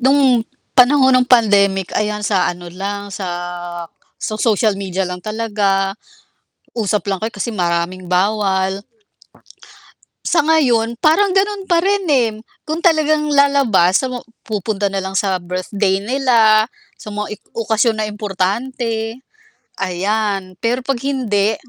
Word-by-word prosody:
Nung 265 Hz, -3 st, +4 dB, 0.3 s
panahon 260 Hz, +1 st, +5 dB
ng -, -, -3 dB
pandemic 200 Hz, -5 st, +3 dB
ayan 210 Hz, 0 st, -1 dB
sa 195 Hz, -3 st, +2 dB
ano 175 Hz, 0 st, -9 dB
lang, 200 Hz, +3 st, -5 dB
sa 195 Hz, -1 st, -5 dB, 0.9 s
sa 215 Hz, -, -3 dB
social 215 Hz, -1 st, +2 dB
media 190 Hz, -1 st, -2 dB
lang 180 Hz, 0 st, -6 dB
talaga, 205 Hz, -3 st, 0 dB, 0.8 s
usap 210 Hz, -4 st, -1 dB
lang 195 Hz, -1 st, -1 dB
kayo 220 Hz, +1 st, -3 dB
kasi 205 Hz, +4 st, -3 dB
maraming 175 Hz, 0 st, -1 dB
bawal. 190 Hz, 0 st, +1 dB, 1.4 s
Sa 335 Hz, -, +3 dB
ngayon 240 Hz, -8 st, +2 dB
parang 355 Hz, +6 st, +3 dB
ganun 395 Hz, 0 st, +1 dB
pa 340 Hz, -1 st, +4 dB
rin, 400 Hz, 0 st, +1 dB
eh. 250 Hz, -6 st, +3 dB, 0.3 s
Kung 315 Hz, +2 st, -3 dB
talagang 310 Hz, -3 st, +2 dB
lalabas 275 Hz, -11 st, +3 dB
sa 260 Hz, -, -2 dB
mga 250 Hz, -1 st, -6 dB, 0.2 s
pupunta 205 Hz, -1 st, -2 dB
na 195 Hz, 0 st, -2 dB
lang 190 Hz, 0 st, -5 dB
sa 195 Hz, -2 st, +1 dB
birthday 190 Hz, +2 st, -1 dB
nila, 225 Hz, -3 st, +3 dB, 0.3 s
sa -, -, -10 dB
mga 210 Hz, 0 st, -4 dB
ik -, -, -39 dB
okasyon 225 Hz, 0 st, +1 dB
na 215 Hz, -, -2 dB
importante, 225 Hz, +4 st, -3 dB, 0.6 s
ayan. 195 Hz, 0 st, -2 dB
Pero 245 Hz, +5 st, -1 dB
'pag 265 Hz, 0 st, -1 dB
hindi, 220 Hz, -6 st, +1 dB
215 Hz, 135 wpm, -18 LUFS, 195-255 Hz, 1.4 s, panahon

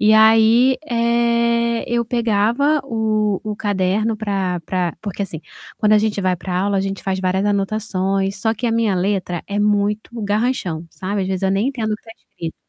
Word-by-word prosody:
e 215 Hz, 0 st, +5 dB
aí, 225 Hz, +4 st, +5 dB
eh, 235 Hz, 0 st, +1 dB
eu 235 Hz, 0 st, 0 dB
pegava 235 Hz, +6 st, +1 dB
o 215 Hz, -5 st, 0 dB
o 215 Hz, -1 st, -3 dB
caderno 205 Hz, +2 st, 0 dB
pra 195 Hz, -4 st, -2 dB
pra 180 Hz, -3 st, -1 dB
porque, 200 Hz, -2 st, -4 dB
assim, 170 Hz, -5 st, -5 dB, 0.4 s
quando 215 Hz, -2 st, +3 dB
a 215 Hz, -, +6 dB
gente 210 Hz, -1 st, 0 dB
vai 185 Hz, -1 st, +1 dB
pra 180 Hz, +1 st, -3 dB
aula, 200 Hz, 0 st, 0 dB
a -, -, +1 dB
gente 195 Hz, 0 st, -3 dB
faz 190 Hz, -1 st, -2 dB
várias 190 Hz, +1 st, 0 dB
anotações, 195 Hz, -1 st, -1 dB
só 220 Hz, +1 st, +1 dB
que 230 Hz, +3 st, -3 dB
a 230 Hz, -, +1 dB
minha 225 Hz, -2 st, +1 dB
letra 180 Hz, -2 st, -1 dB
é 200 Hz, -, -4 dB
muito 210 Hz, 0 st, +1 dB
garranchão, 205 Hz, -6 st, -1 dB
sabe, 200 Hz, +2 st, -3 dB
às 185 Hz, -, -3 dB
vezes 190 Hz, 0 st, -2 dB
eu 190 Hz, -, +2 dB
nem 200 Hz, +6 st, +1 dB
entendo 230 Hz, -6 st, -2 dB
o -, -, -1 dB
que -, -, -29 dB
está 225 Hz, -, -12 dB, 0.2 s
escrito. 165 Hz, -1 st, -7 dB
210 Hz, 195 wpm, -20 LUFS, 195-225 Hz, 0.4 s, a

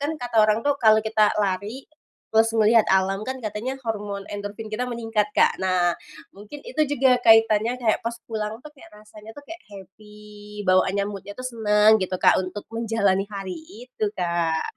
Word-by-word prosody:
Kan 290 Hz, +2 st, -2 dB
kata 245 Hz, -2 st, -5 dB
orang 215 Hz, +1 st, +2 dB
tuh 285 Hz, -1 st, +1 dB
kalau 220 Hz, -1 st, +5 dB
kita 215 Hz, -1 st, +2 dB
lari, 205 Hz, +6 st, -3 dB, 0.4 s
terus 225 Hz, +1 st, +2 dB
ngelihat 225 Hz, 0 st, +4 dB
alam 195 Hz, +2 st, +1 dB
kan 260 Hz, 0 st, -5 dB
katanya 230 Hz, +5 st, -5 dB
hormon 205 Hz, -4 st, -5 dB
endorfin 205 Hz, +2 st, -7 dB
kita 215 Hz, +4 st, -3 dB
meningkat, 225 Hz, -3 st, -1 dB
Kak. -, -, +3 dB
Nah, 180 Hz, -2 st, +1 dB, 0.4 s
mungkin 210 Hz, +9 st, -11 dB
itu -, -, -3 dB
juga 260 Hz, -2 st, +3 dB
kaitannya 225 Hz, +2 st, +4 dB
kayak 220 Hz, -3 st, +1 dB
pas 230 Hz, -, -2 dB, 0.2 s
pulang 220 Hz, +1 st, -4 dB
tuh 300 Hz, -, -11 dB
kayak 225 Hz, -5 st, -17 dB
rasanya 210 Hz, +1 st, -14 dB
tuh 290 Hz, -, -12 dB
kayak 335 Hz, +1 st, -10 dB
happy, 210 Hz, +2 st, -13 dB
bawaannya 185 Hz, +2 st, +2 dB
mood-nya 205 Hz, 0 st, -8 dB
tuh 255 Hz, -, -4 dB
seneng 215 Hz, -2 st, +3 dB
gitu 185 Hz, -, -3 dB
Kak, -, -, +5 dB
untuk 200 Hz, +2 st, -7 dB
menjalani 205 Hz, -4 st, 0 dB
hari 195 Hz, -2 st, -6 dB, 0.3 s
itu, 235 Hz, -, -4 dB
Kak. 170 Hz, -3 st, -2 dB
215 Hz, 170 wpm, -23 LUFS, 200-230 Hz, 0.4 s, kalau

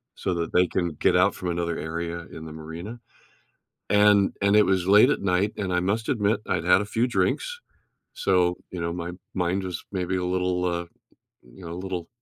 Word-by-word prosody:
so 95 Hz, -, -2 dB
that 85 Hz, -1 st, -3 dB
they 90 Hz, -, +5 dB
can 85 Hz, -2 st, -1 dB
get -, -, +3 dB
out 90 Hz, +2 st, +4 dB
from 90 Hz, -, -4 dB
another 85 Hz, -1 st, -2 dB
area 85 Hz, +1 st, -4 dB
in 80 Hz, -, -9 dB
the 80 Hz, -, -8 dB
marina, 80 Hz, +9 st, -8 dB, 0.9 s
and 105 Hz, -1 st, +5 dB
and 100 Hz, +1 st, +4 dB
it 105 Hz, -, +6 dB
was 95 Hz, -2 st, +1 dB
late 105 Hz, +7 st, +7 dB
at 145 Hz, -, -1 dB
night, 100 Hz, +2 st, +1 dB
and 95 Hz, -3 st, -2 dB
I 90 Hz, -, +2 dB
must 105 Hz, +5 st, -1 dB
admit, 105 Hz, -2 st, +1 dB
I'd 90 Hz, -3 st, 0 dB
had 90 Hz, +2 st, +5 dB
a -, -, -6 dB
few 115 Hz, +3 st, +1 dB
drinks, 480 Hz, -, -1 dB, 0.5 s
so, 90 Hz, -2 st, +2 dB
you 90 Hz, -, -6 dB
know, 85 Hz, 0 st, -2 dB
my 85 Hz, 0 st, -4 dB, 0.2 s
mind 95 Hz, +1 st, 0 dB
was 90 Hz, -3 st, -5 dB
maybe 95 Hz, -1 st, -1 dB
a 90 Hz, -, -2 dB
little, 90 Hz, 0 st, 0 dB
uh, 85 Hz, -1 st, -1 dB, 0.6 s
you -, -, -16 dB
know, 85 Hz, -, -6 dB
a -, -, -5 dB
little 90 Hz, -3 st, -4 dB
90 Hz, 205 wpm, -25 LUFS, 85-100 Hz, 0.9 s, late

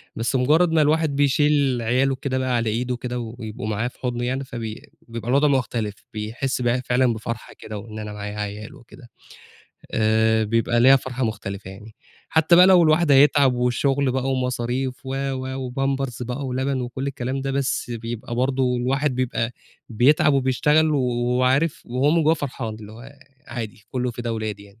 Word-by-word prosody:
بس 115 Hz, +3 st, -1 dB
مجرّد 155 Hz, +7 st, +3 dB
ما 160 Hz, -1 st, +4 dB
الواحد 155 Hz, -1 st, +2 dB
بيشيل 145 Hz, -3 st, +2 dB
عياله 130 Hz, +4 st, +1 dB
كده 130 Hz, 0 st, -3 dB
بقى 130 Hz, -1 st, 0 dB
على 115 Hz, -2 st, 0 dB
إيده 125 Hz, +3 st, -1 dB
كده، 125 Hz, 0 st, -4 dB
و 115 Hz, 0 st, -6 dB
ويبقوا 110 Hz, 0 st, -6 dB
معاه 110 Hz, +3 st, -1 dB
في -, -, -11 dB
حُضنه 120 Hz, -1 st, -2 dB
يعني، 130 Hz, +2 st, -2 dB
فبي 115 Hz, -4 st, -7 dB, 0.2 s
بيبقى 115 Hz, 0 st, -6 dB
الوضع 140 Hz, +3 st, +4 dB
مختلف، 115 Hz, -6 st, -1 dB, 0.2 s
بيحس 115 Hz, +5 st, -3 dB
بقى 120 Hz, 0 st, +2 dB
ه 125 Hz, -, -4 dB
فعلًا 125 Hz, -1 st, +2 dB
بفرحة 110 Hz, +1 st, -6 dB
كده، 110 Hz, -, -7 dB
وإن 110 Hz, +1 st, -8 dB
أنا 105 Hz, -1 st, -6 dB
معايا 105 Hz, 0 st, -6 dB
عيال 105 Hz, +1 st, -6 dB
وكده، 120 Hz, +1 st, -16 dB, 0.8 s
آآ 110 Hz, 0 st, +2 dB
بيبقى 115 Hz, +2 st, +1 dB
ليها 135 Hz, +3 st, +7 dB
فرحة 130 Hz, -1 st, -3 dB
مختلفة 100 Hz, -3 st, -5 dB
يعني، 105 Hz, +3 st, -12 dB, 0.3 s
حتى 160 Hz, +2 st, +4 dB
بقى 180 Hz, -, +8 dB
لو 185 Hz, -2 st, +7 dB
الواحد 155 Hz, -1 st, +4 dB
هيتعب، 140 Hz, -1 st, +5 dB
والشُغل 130 Hz, +2 st, +1 dB
بقى، 130 Hz, +1 st, -1 dB
ومصاريف، 125 Hz, 0 st, -1 dB
و، 130 Hz, -, -3 dB, 0.2 s
و، 130 Hz, 0 st, -4 dB
وpampers 135 Hz, -1 st, -2 dB
بقى، 125 Hz, +3 st, -4 dB
ولبن، 130 Hz, +1 st, -1 dB
وكل 125 Hz, +2 st, -4 dB
الكلام 130 Hz, 0 st, -3 dB
ده، 135 Hz, 0 st, -3 dB
بس 135 Hz, -2 st, -1 dB
بيبقى 115 Hz, 0 st, -5 dB
برضه 130 Hz, 0 st, +1 dB
الواحد 135 Hz, +3 st, 0 dB
بيبقى 125 Hz, -2 st, -1 dB, 0.4 s
بيتعب، 130 Hz, +6 st, +4 dB
وبيشتغل، 150 Hz, +4 st, +2 dB
و 150 Hz, -, +2 dB
وعارف، 125 Hz, +4 st, +1 dB
وهو 130 Hz, +4 st, +1 dB
من 165 Hz, 0 st, +3 dB
جوّاه 155 Hz, +2 st, +4 dB
فرحان، 125 Hz, -7 st, -5 dB
اللي 110 Hz, -1 st, -11 dB
هو 125 Hz, +5 st, -12 dB, 0.3 s
عادي، 110 Hz, -3 st, -7 dB
كلّه 125 Hz, -1 st, -1 dB
فدا 120 Hz, 0 st, -5 dB
ولادي 110 Hz, -2 st, -4 dB
يعني. 100 Hz, +2 st, -20 dB
125 Hz, 180 wpm, -23 LUFS, 115-135 Hz, 0.8 s, بقى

